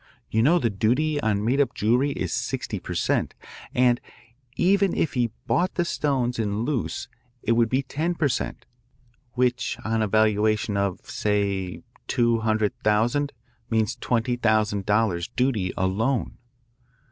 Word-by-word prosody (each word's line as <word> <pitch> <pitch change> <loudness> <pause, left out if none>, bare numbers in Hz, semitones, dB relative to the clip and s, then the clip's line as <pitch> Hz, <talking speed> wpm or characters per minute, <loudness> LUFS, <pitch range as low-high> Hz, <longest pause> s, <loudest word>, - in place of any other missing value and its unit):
You 110 - +2
know 155 +9 +5
the 120 -9 +1
duty 130 +9 +1
on 105 -1 0
made 135 +5 +3
up 135 - 0
jewellery 120 +7 +2
is - - -3
sixty - - -3
per - - -6
cent., - - 0 0.4
and 125 -1 +3 0.5
even 195 +1 +3
if 155 - 0
he 120 -3 +1 0.2
brought 180 +2 +1
the 175 - +1
stones 130 -7 0
in 105 0 -1
loose 130 -3 -2 0.4
it - - +1
would 115 -1 +3
be 130 +3 +1
ten 160 +6 -2
per 155 -3 +2
cent., 125 - -3 0.7
which 125 -1 0
on 110 0 0
a 110 - +1
valuation 110 0 +2
of, 100 -2 -1
say, 100 -3 -1 0.2
two 120 -1 +2
hundred 110 -2 +1
thousand, 120 +7 +1 0.4
means 110 -2 +1
twenty 120 0 0
thousand 110 -4 +1
dollars 105 -5 +1
duty 120 -8 +1
alone. 110 +7 0
115 Hz, 145 wpm, -25 LUFS, 105-130 Hz, 0.7 s, know